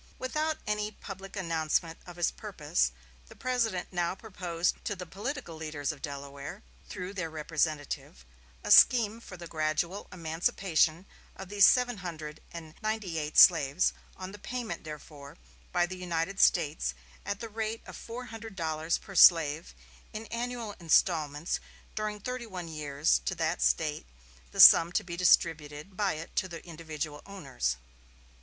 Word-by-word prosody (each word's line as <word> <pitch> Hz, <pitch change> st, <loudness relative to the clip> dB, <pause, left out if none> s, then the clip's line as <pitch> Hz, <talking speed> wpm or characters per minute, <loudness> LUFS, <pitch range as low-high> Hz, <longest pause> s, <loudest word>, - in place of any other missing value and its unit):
Without 305 Hz, +4 st, -1 dB
any 210 Hz, 0 st, -1 dB
public 195 Hz, -2 st, -10 dB
announcement 165 Hz, -2 st, -1 dB
of 175 Hz, -, -9 dB
his 175 Hz, -2 st, +1 dB
purpose, -, -, -1 dB, 0.4 s
the -, -, -14 dB
President 230 Hz, -9 st, -1 dB
now 175 Hz, 0 st, 0 dB
proposed 180 Hz, -5 st, -2 dB
to 205 Hz, -, -2 dB
the 180 Hz, -1 st, -7 dB
political 205 Hz, -, -5 dB
leaders 155 Hz, -2 st, -3 dB
of 145 Hz, -3 st, -12 dB
Delaware, 140 Hz, +5 st, -7 dB, 0.3 s
through 185 Hz, 0 st, -6 dB
their 180 Hz, -5 st, -3 dB
representative, 150 Hz, -, -3 dB, 0.4 s
a -, -, -2 dB
scheme 230 Hz, -3 st, +7 dB
for 185 Hz, -, -10 dB
the 170 Hz, -, -9 dB
gradual 160 Hz, +4 st, -2 dB
emancipation 165 Hz, 0 st, 0 dB, 0.3 s
of 190 Hz, -1 st, -9 dB
these 200 Hz, -1 st, +7 dB
seventeen 245 Hz, -4 st, +3 dB
hundred 155 Hz, -4 st, -6 dB
and 160 Hz, -2 st, -9 dB
ninety 215 Hz, -6 st, -2 dB
eight 150 Hz, 0 st, -4 dB
slaves, 155 Hz, -1 st, +6 dB, 0.2 s
on 185 Hz, 0 st, -7 dB
the 205 Hz, -, -11 dB
payment 245 Hz, +2 st, -5 dB
therefore 150 Hz, -1 st, -10 dB, 0.3 s
by 175 Hz, 0 st, +2 dB
the 185 Hz, +1 st, -7 dB
United 180 Hz, +1 st, -2 dB
States 155 Hz, -4 st, +2 dB, 0.3 s
at 200 Hz, 0 st, -3 dB
the 230 Hz, -, -5 dB
rate 220 Hz, +1 st, -4 dB
of -, -, -10 dB
four 240 Hz, +2 st, -7 dB
hundred 225 Hz, -2 st, -9 dB
dollars 160 Hz, -1 st, -1 dB
per 195 Hz, -, -12 dB
slave, 160 Hz, -, +5 dB, 0.4 s
in 215 Hz, +1 st, -6 dB
annual 235 Hz, -2 st, -3 dB
instalments 160 Hz, -2 st, +1 dB, 0.3 s
during 215 Hz, -1 st, -3 dB
thirty 250 Hz, +2 st, -5 dB
one 180 Hz, -4 st, -6 dB
years 140 Hz, -, 0 dB
to -, -, -1 dB
that -, -, -1 dB
State, -, -, +1 dB, 0.4 s
the -, -, -8 dB
sum 170 Hz, +1 st, +10 dB
to -, -, 0 dB
be 170 Hz, -1 st, -6 dB
distributed 165 Hz, -1 st, +2 dB
by 200 Hz, 0 st, +1 dB
it 155 Hz, +2 st, -8 dB
to 185 Hz, -, +1 dB
the 170 Hz, -2 st, -9 dB
individual 155 Hz, -3 st, -6 dB
owners. 135 Hz, -, -2 dB
175 Hz, 150 wpm, -30 LUFS, 155-205 Hz, 0.4 s, sum